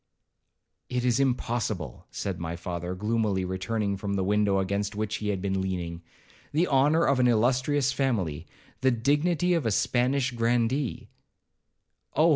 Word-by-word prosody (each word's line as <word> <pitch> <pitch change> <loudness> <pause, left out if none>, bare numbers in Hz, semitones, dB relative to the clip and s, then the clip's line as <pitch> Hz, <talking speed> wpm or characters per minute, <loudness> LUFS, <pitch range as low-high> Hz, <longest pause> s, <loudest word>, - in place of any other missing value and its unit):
'It 125 0 -1
is 120 0 +2
impossible,' 115 - -1
said 95 -3 -4
my 85 0 -4
father, 90 +1 -4
gloomily 105 -2 0
returning 100 +3 -1
from 100 +1 -3
the 95 - 0
window 105 0 +2
against 100 +2 -1
which 105 0 -2
he 105 - -3
had 95 -2 -2
been 95 -1 0
leaning; 85 -3 -3 0.5
'the 165 +4 +2
honour 145 +4 +4
of 135 -1 +2
an 125 - +4
illustrious 130 +4 +2
family,—the 105 - -2
dignity 150 +8 +2
of 165 -4 +1
a - - +3
Spanish 125 +5 +1
grandee—' 120 +2 0 1.1
'Oh! 155 +4 +5
110 Hz, 140 wpm, -27 LUFS, 95-130 Hz, 1.1 s, Oh